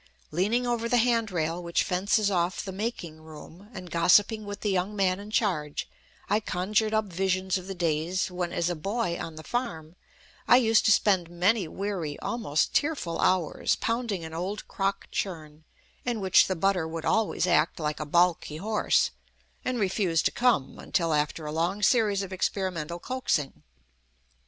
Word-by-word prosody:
Leaning 210 Hz, +10 st, +1 dB
over 235 Hz, -1 st, -1 dB
the 245 Hz, -, +3 dB
hand 230 Hz, -2 st, +2 dB
rail 170 Hz, -1 st, -2 dB
which 170 Hz, -1 st, 0 dB
fences 200 Hz, +3 st, +1 dB
off 175 Hz, +1 st, 0 dB
the 190 Hz, -, -5 dB
"making" 185 Hz, -6 st, -5 dB
room, 160 Hz, +5 st, -13 dB
and 185 Hz, -6 st, -9 dB
gossiping 205 Hz, +6 st, +4 dB
with 205 Hz, 0 st, -7 dB
the 210 Hz, -, 0 dB
young 190 Hz, +2 st, -1 dB
man 190 Hz, -2 st, +1 dB
in 205 Hz, +1 st, -9 dB
charge, 175 Hz, -10 st, -1 dB, 0.4 s
I 210 Hz, -, +2 dB
conjured 210 Hz, +2 st, 0 dB
up 220 Hz, 0 st, +1 dB
visions 185 Hz, 0 st, -1 dB
of 185 Hz, -, -11 dB
the 195 Hz, -, -5 dB
days 170 Hz, +2 st, -1 dB
when, 180 Hz, -1 st, -3 dB
as 170 Hz, -, 0 dB
a 175 Hz, -, -1 dB
boy 195 Hz, +2 st, -2 dB
on 165 Hz, -, -6 dB
the 155 Hz, -, -9 dB
farm, 170 Hz, -10 st, -4 dB, 0.5 s
I 245 Hz, -, +8 dB
used 225 Hz, -3 st, +3 dB
to 220 Hz, -, +5 dB
spend 190 Hz, -5 st, +3 dB
many 180 Hz, +3 st, +1 dB
weary, 180 Hz, -5 st, -4 dB
almost 200 Hz, -11 st, -1 dB
tearful 285 Hz, -, 0 dB
hours, 180 Hz, -4 st, +1 dB
pounding 230 Hz, -7 st, -2 dB
an 160 Hz, -, -8 dB
old 185 Hz, +5 st, -4 dB
crock 195 Hz, 0 st, -2 dB
churn, 155 Hz, -5 st, -5 dB, 0.4 s
in 240 Hz, -3 st, -2 dB
which 190 Hz, -2 st, +5 dB
the 190 Hz, -, -1 dB
butter 180 Hz, -1 st, +1 dB
would 160 Hz, 0 st, -5 dB
always 220 Hz, -4 st, +1 dB
act 170 Hz, -3 st, +2 dB
like 150 Hz, -1 st, -2 dB
a 155 Hz, -, -3 dB
balky 170 Hz, -1 st, +2 dB
horse 210 Hz, +5 st, +1 dB, 0.5 s
and 255 Hz, -1 st, -1 dB
refuse 185 Hz, -4 st, +1 dB
to -, -, +2 dB
"come" 240 Hz, -, +1 dB
until 165 Hz, -2 st, 0 dB
after 150 Hz, +1 st, -1 dB
a 150 Hz, -, -4 dB
long 175 Hz, +6 st, -1 dB
series 205 Hz, -3 st, +3 dB
of 190 Hz, -1 st, -7 dB
experimental 180 Hz, -4 st, -2 dB
coaxing. 175 Hz, -, -2 dB
185 Hz, 170 wpm, -27 LUFS, 165-210 Hz, 0.5 s, I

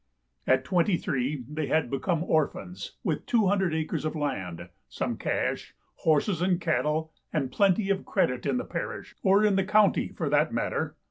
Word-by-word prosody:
At 130 Hz, 0 st, +4 dB
twenty 180 Hz, +1 st, +2 dB
three 140 Hz, -, -2 dB
they 150 Hz, 0 st, -3 dB
had 155 Hz, -6 st, +1 dB
become 165 Hz, +4 st, 0 dB
orphans, 175 Hz, +3 st, -1 dB
with -, -, -2 dB
two 230 Hz, -4 st, +3 dB
hundred 190 Hz, -3 st, +2 dB
acres 160 Hz, -1 st, -2 dB
of 155 Hz, +1 st, -2 dB
land, 95 Hz, -, -3 dB, 0.2 s
some -, -, -2 dB
cash, -, -, -2 dB, 0.2 s
horses 160 Hz, +3 st, +2 dB
and 180 Hz, -1 st, +2 dB
cattle, 160 Hz, -1 st, 0 dB, 0.2 s
and 135 Hz, -5 st, -1 dB
plenty 195 Hz, +4 st, +2 dB
of 195 Hz, 0 st, 0 dB
credit 125 Hz, -10 st, 0 dB
in -, -, +1 dB
the 250 Hz, -, -3 dB
parish, -, -, -5 dB
or 200 Hz, +2 st, +4 dB
in 200 Hz, -2 st, +3 dB
the 195 Hz, -, +3 dB
county, 210 Hz, +2 st, +3 dB
for -, -, -4 dB
that -, -, +2 dB
matter. -, -, -2 dB
165 Hz, 175 wpm, -27 LUFS, 150-195 Hz, 0.2 s, At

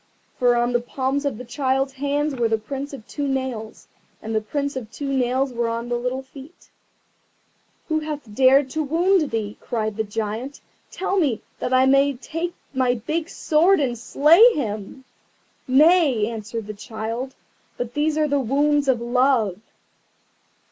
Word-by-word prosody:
For 245 Hz, -2 st, +4 dB
on 240 Hz, +1 st, +1 dB
the 240 Hz, -, +2 dB
palms 265 Hz, +3 st, -2 dB
of 280 Hz, -6 st, -1 dB
the 250 Hz, -, -8 dB
child's 270 Hz, +2 st, -1 dB
hands 285 Hz, +2 st, -1 dB
were 240 Hz, -3 st, +1 dB
the 225 Hz, 0 st, +1 dB
prints 275 Hz, +6 st, -6 dB
of 255 Hz, -5 st, -10 dB
two 285 Hz, -1 st, -3 dB
nails, 260 Hz, -5 st, -4 dB, 0.3 s
and 220 Hz, +1 st, -6 dB
the 220 Hz, -, +1 dB
prints 280 Hz, +6 st, -3 dB
of 240 Hz, -5 st, -5 dB
two 280 Hz, -1 st, -4 dB
nails 260 Hz, +1 st, 0 dB
were 235 Hz, -1 st, -1 dB
on 230 Hz, +1 st, -4 dB
the 240 Hz, -, 0 dB
little 250 Hz, +2 st, -2 dB
feet. 275 Hz, +4 st, -15 dB, 1.2 s
"Who 315 Hz, -1 st, +1 dB
hath 300 Hz, -8 st, -6 dB
dared 265 Hz, +3 st, +4 dB
to 315 Hz, -, -1 dB
wound 330 Hz, +2 st, +2 dB
thee?" 215 Hz, -2 st, -4 dB
cried 215 Hz, -2 st, -3 dB
the 220 Hz, -, +1 dB
Giant; 220 Hz, +5 st, -4 dB, 0.3 s
"tell 385 Hz, +1 st, -2 dB
me, 275 Hz, -10 st, 0 dB, 0.2 s
that -, -, -3 dB
I 260 Hz, 0 st, +5 dB
may 275 Hz, +1 st, +4 dB
take 330 Hz, +7 st, -5 dB, 0.2 s
my 255 Hz, -2 st, +2 dB
big 310 Hz, +8 st, -3 dB
sword 340 Hz, +5 st, +3 dB
and 255 Hz, -4 st, 0 dB
slay 300 Hz, -, +5 dB
him." 215 Hz, -1 st, -4 dB, 0.6 s
"Nay!" 285 Hz, -4 st, +4 dB
answered 225 Hz, 0 st, -5 dB
the 210 Hz, -, -6 dB
child; 225 Hz, +5 st, -5 dB, 0.4 s
"but 245 Hz, -1 st, -4 dB
these 300 Hz, +1 st, 0 dB
are 305 Hz, -1 st, +2 dB
the 285 Hz, -1 st, +1 dB
wounds 285 Hz, +3 st, +1 dB
of 255 Hz, -3 st, +3 dB
Love." 240 Hz, -5 st, +1 dB
260 Hz, 165 wpm, -22 LUFS, 230-285 Hz, 1.2 s, I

